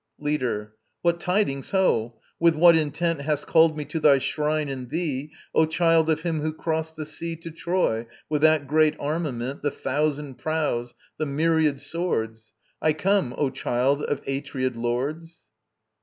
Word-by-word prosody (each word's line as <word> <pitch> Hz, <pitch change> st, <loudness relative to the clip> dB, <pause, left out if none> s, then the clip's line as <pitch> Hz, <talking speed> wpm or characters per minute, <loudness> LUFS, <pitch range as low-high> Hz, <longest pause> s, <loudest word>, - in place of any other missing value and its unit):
LEADER. 125 Hz, -8 st, -2 dB, 0.3 s
What 170 Hz, 0 st, +2 dB
tidings, 180 Hz, -8 st, 0 dB
ho? 120 Hz, -, +1 dB, 0.2 s
With 170 Hz, -1 st, +4 dB
what 170 Hz, +2 st, +7 dB
intent 160 Hz, 0 st, 0 dB
Hast 145 Hz, 0 st, -1 dB
called 160 Hz, -1 st, +4 dB
me 150 Hz, -, -3 dB
to 160 Hz, -, -3 dB
thy 145 Hz, -3 st, +6 dB
shrine 150 Hz, +2 st, -1 dB
and 130 Hz, -3 st, -5 dB
thee, 150 Hz, -2 st, -2 dB, 0.2 s
O 160 Hz, -, +4 dB
child 165 Hz, 0 st, +3 dB
of 160 Hz, -1 st, +1 dB
him 165 Hz, -2 st, -1 dB
who 155 Hz, +1 st, -1 dB
crossed 160 Hz, 0 st, -2 dB
the 155 Hz, -1 st, -5 dB
sea 165 Hz, +2 st, -4 dB
To 165 Hz, +1 st, -9 dB
Troy 165 Hz, -9 st, -1 dB, 0.2 s
with 150 Hz, -1 st, -1 dB
that 155 Hz, -2 st, +4 dB
great 155 Hz, +2 st, +3 dB
armament, 140 Hz, -4 st, -3 dB
The 145 Hz, -, +1 dB
thousand 145 Hz, -1 st, -2 dB
prows, 150 Hz, -7 st, -1 dB, 0.2 s
the 155 Hz, -, -1 dB
myriad 155 Hz, 0 st, +2 dB
swords? 115 Hz, -11 st, -3 dB, 0.3 s
I 155 Hz, -, +3 dB
come, 185 Hz, -6 st, +1 dB
O 140 Hz, -3 st, +1 dB
child 130 Hz, +2 st, 0 dB
of 145 Hz, -1 st, -2 dB
Atreid 135 Hz, -2 st, -2 dB
Lords. 140 Hz, +8 st, -3 dB
150 Hz, 155 wpm, -25 LUFS, 135-160 Hz, 0.3 s, what